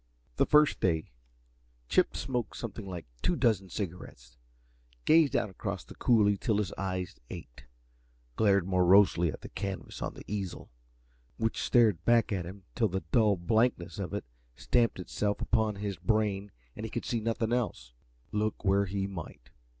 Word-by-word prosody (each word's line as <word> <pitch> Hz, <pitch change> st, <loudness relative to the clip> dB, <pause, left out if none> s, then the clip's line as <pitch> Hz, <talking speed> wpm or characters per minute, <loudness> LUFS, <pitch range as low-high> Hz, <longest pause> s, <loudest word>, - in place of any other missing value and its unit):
That -, -, +2 dB
first 150 Hz, 0 st, +5 dB
day 80 Hz, -7 st, 0 dB, 0.8 s
Chip -, -, +2 dB
smoked 125 Hz, -4 st, -3 dB
something 110 Hz, -3 st, -6 dB
like 90 Hz, -3 st, -6 dB, 0.2 s
two 175 Hz, -, +1 dB
dozen 110 Hz, -, +1 dB
cigarettes, 85 Hz, -, -7 dB, 0.7 s
gazed 155 Hz, -5 st, +5 dB
out 105 Hz, -, +1 dB
across -, -, -4 dB
the -, -, -12 dB
coulee 105 Hz, -4 st, +3 dB
till 105 Hz, +1 st, 0 dB
his 105 Hz, -2 st, -1 dB
eyes 95 Hz, -2 st, -4 dB
ached, -, -, -10 dB, 0.7 s
glared 100 Hz, -4 st, +3 dB
morosely 90 Hz, -2 st, +5 dB
at -, -, -9 dB
the -, -, -9 dB
canvas 95 Hz, -1 st, -5 dB
on -, -, -3 dB
the -, -, -11 dB
easel, 100 Hz, -9 st, -5 dB, 0.7 s
which 115 Hz, 0 st, -1 dB
stared 110 Hz, -8 st, +3 dB
back 120 Hz, 0 st, +3 dB
at 90 Hz, -4 st, -2 dB
him 95 Hz, +2 st, -10 dB
till 115 Hz, -2 st, +2 dB
the 95 Hz, 0 st, -3 dB
dull 110 Hz, -4 st, +4 dB
blankness 110 Hz, +2 st, +1 dB
of 95 Hz, -, -3 dB
it 100 Hz, -, -4 dB, 0.3 s
stamped 115 Hz, -, +1 dB
itself 100 Hz, +3 st, -2 dB
upon 110 Hz, -2 st, +1 dB
his 100 Hz, -2 st, -4 dB
brain 100 Hz, +1 st, 0 dB, 0.2 s
and -, -, -7 dB
he -, -, -3 dB
could -, -, -4 dB
see 120 Hz, -, -1 dB
nothing 115 Hz, +1 st, -1 dB
else, -, -, -2 dB, 0.4 s
look 105 Hz, 0 st, -2 dB
where 100 Hz, +1 st, +3 dB
he 95 Hz, +1 st, -2 dB
might. 85 Hz, -10 st, -8 dB
100 Hz, 160 wpm, -30 LUFS, 95-110 Hz, 0.8 s, first